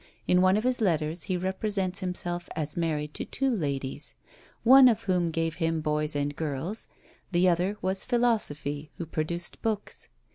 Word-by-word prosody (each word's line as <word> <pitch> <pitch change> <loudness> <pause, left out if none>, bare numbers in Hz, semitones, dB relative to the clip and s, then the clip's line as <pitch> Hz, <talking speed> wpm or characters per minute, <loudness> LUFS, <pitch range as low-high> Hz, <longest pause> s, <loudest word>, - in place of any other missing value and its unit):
In 180 0 +4
one 185 +2 +4
of 215 - -1
his 250 -1 +3
letters, 160 -4 0
he 185 - -1
represents 190 0 -1
himself 175 -1 -3
as 155 -2 -2
married 155 -3 -1
to - - -4
two 270 -3 -1
ladies; 140 -7 -3 0.5
one 260 +2 +9
of 225 -2 +2
whom 180 -4 +1
gave 165 -1 -2
him 165 -1 0
boys 150 0 -1
and 145 0 -1
girls, 160 +8 -3 0.4
the 180 +1 +3
other 180 +4 +1
was 190 +1 0
Philosophy, 155 - 0
who 170 - -4
produced 170 +2 -3
books. 215 -2 -3
175 Hz, 160 wpm, -28 LUFS, 155-200 Hz, 0.5 s, one